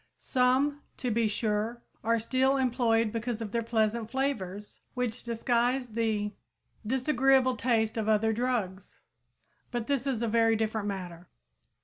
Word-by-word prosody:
Some, 265 +3 +1 0.2
to 250 - -2
be 225 0 +2
sure, 215 +2 -1 0.2
are 230 +1 +2
still 260 +4 +2
employed 235 -4 +2
because 230 0 -3
of 220 -3 -5
their 235 - 0
pleasant 225 -1 0
flavors, 210 -7 -3 0.2
which 250 -1 -2
disguise 240 +2 0
the 215 -2 -1 0.5
disagreeable 260 +1 +3
taste 225 -3 +1
of 220 -1 0
other 220 +1 +3
drugs. 215 -6 -2 0.7
But 240 -2 -3
this 275 0 -1
is 240 -4 -1
a - - +1
very 225 0 +3
different 220 -1 -1
matter. 180 -3 -6
230 Hz, 135 wpm, -29 LUFS, 220-250 Hz, 0.7 s, disagreeable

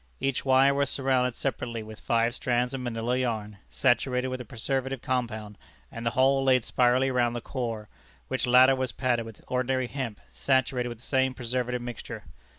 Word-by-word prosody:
Each 135 -1 -1
wire 135 +1 +5
was 140 -1 +1
surrounded 130 -3 +1
separately 115 -3 -3
with 110 0 -10
five 115 0 +1
strands 125 0 0
of 135 - -3
Manilla 120 0 -1
yarn, 110 -5 -2
saturated 125 0 +1
with 130 0 -4
a - - -8
preservative 130 +3 -2
compound, 110 -5 -3 0.3
and 115 - -7
the 115 - +2
whole 135 +1 +4
laid 130 -2 +4
spirally 125 +3 +2
round 120 -2 +1
the - - -2
core, 115 -4 -4 0.4
which 130 -1 -1
latter 130 +2 +7
was 130 -2 -2
padded 120 -3 0
with 110 - -12
ordinary 130 0 0
hemp, 125 -4 -5
saturated 125 - +1
with 120 - -7
the 115 - -17
same 130 -1 +1
preservative 125 0 -2
mixture. 120 -2 -7
125 Hz, 175 wpm, -27 LUFS, 120-130 Hz, 0.4 s, latter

